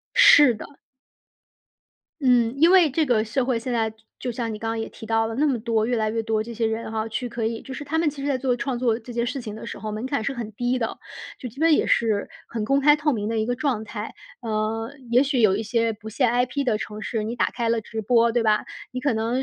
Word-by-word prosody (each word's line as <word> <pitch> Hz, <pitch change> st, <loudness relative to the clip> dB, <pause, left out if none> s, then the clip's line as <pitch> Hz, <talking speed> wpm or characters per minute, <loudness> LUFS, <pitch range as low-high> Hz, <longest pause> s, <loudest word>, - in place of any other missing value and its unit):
是 290 Hz, -5 st, +8 dB
的。 210 Hz, -, -8 dB, 1.5 s
嗯， 245 Hz, -3 st, +3 dB
因 325 Hz, +4 st, +5 dB
为 360 Hz, -5 st, +6 dB
这 315 Hz, +4 st, +1 dB
个 235 Hz, -6 st, +2 dB
社 245 Hz, +4 st, -1 dB
会 250 Hz, -2 st, 0 dB
现 245 Hz, +2 st, -4 dB
在 225 Hz, -2 st, +1 dB
就 220 Hz, -, -20 dB, 0.2 s
就 250 Hz, -, -3 dB
像 230 Hz, -1 st, -3 dB
你 -, -, -5 dB
刚 225 Hz, +1 st, -4 dB
刚 225 Hz, -, -2 dB
也 225 Hz, -, -3 dB
提 -, -, -12 dB
到 225 Hz, 0 st, +2 dB
了， 225 Hz, -, -4 dB
那 290 Hz, +6 st, +2 dB
么 255 Hz, -, 0 dB
多 225 Hz, -1 st, 0 dB
越 245 Hz, -, 0 dB
来 220 Hz, -1 st, +1 dB
越 225 Hz, +1 st, -1 dB
多 220 Hz, -1 st, 0 dB
这 235 Hz, +1 st, -8 dB
些 230 Hz, -, -1 dB
人 225 Hz, 0 st, -3 dB
哈， 220 Hz, 0 st, -2 dB
去 245 Hz, +3 st, -3 dB
可 230 Hz, -1 st, -4 dB
以 225 Hz, 0 st, -2 dB
就 265 Hz, -, -8 dB
是 295 Hz, -, -6 dB
他 300 Hz, +3 st, -2 dB
们 325 Hz, -, +2 dB
其 285 Hz, -1 st, -5 dB
实 285 Hz, -, -2 dB
在 270 Hz, -2 st, +1 dB
做 255 Hz, -1 st, +1 dB
创 255 Hz, 0 st, -2 dB
作 240 Hz, -3 st, +2 dB
这 240 Hz, +1 st, -10 dB
件 235 Hz, 0 st, -1 dB
事 270 Hz, +3 st, -3 dB
情 215 Hz, -3 st, -7 dB
的 220 Hz, -, -8 dB
时 -, -, -6 dB
候， 215 Hz, -, -5 dB
门 215 Hz, +4 st, -4 dB
槛 275 Hz, -4 st, -1 dB
是 280 Hz, -, -1 dB
很 235 Hz, -4 st, -6 dB
低 245 Hz, +4 st, -1 dB
的。 225 Hz, -2 st, -2 dB, 0.4 s
就 250 Hz, -, -5 dB
基 245 Hz, -, -16 dB
本 325 Hz, +1 st, +4 dB
也 -, -, +2 dB
是 215 Hz, -3 st, +1 dB, 0.2 s
很 225 Hz, -2 st, -4 dB
公 275 Hz, +5 st, +2 dB
开 295 Hz, +1 st, +6 dB
透 295 Hz, 0 st, +1 dB
明 210 Hz, -2 st, -2 dB
的 225 Hz, 0 st, -1 dB
一 -, -, +1 dB
个 245 Hz, +1 st, -1 dB
状 255 Hz, -6 st, -1 dB
态。 215 Hz, 0 st, -6 dB, 0.3 s
呃， 225 Hz, +1 st, -2 dB, 0.2 s
也 240 Hz, +1 st, +5 dB
许 270 Hz, -3 st, 0 dB
有 200 Hz, -3 st, +4 dB
一 220 Hz, -, -2 dB
些 230 Hz, +1 st, +1 dB
不 215 Hz, +1 st, -10 dB
限 235 Hz, +2 st, +1 dB
IP 250 Hz, +3 st, 0 dB
的 230 Hz, -5 st, +1 dB
城 215 Hz, 0 st, -6 dB
市， 220 Hz, -2 st, -2 dB
你 225 Hz, -, -3 dB
打 -, -, +2 dB
开 235 Hz, -2 st, -2 dB
了 230 Hz, -1 st, +1 dB
直 220 Hz, 0 st, -6 dB
播， 235 Hz, +2 st, +4 dB
对 235 Hz, 0 st, +1 dB
吧？ 215 Hz, -1 st, +3 dB, 0.3 s
你 255 Hz, -, -3 dB
可 280 Hz, -1 st, +1 dB
能 230 Hz, +4 st, 0 dB
235 Hz, 300 characters per minute, -24 LUFS, 220-255 Hz, 1.5 s, 是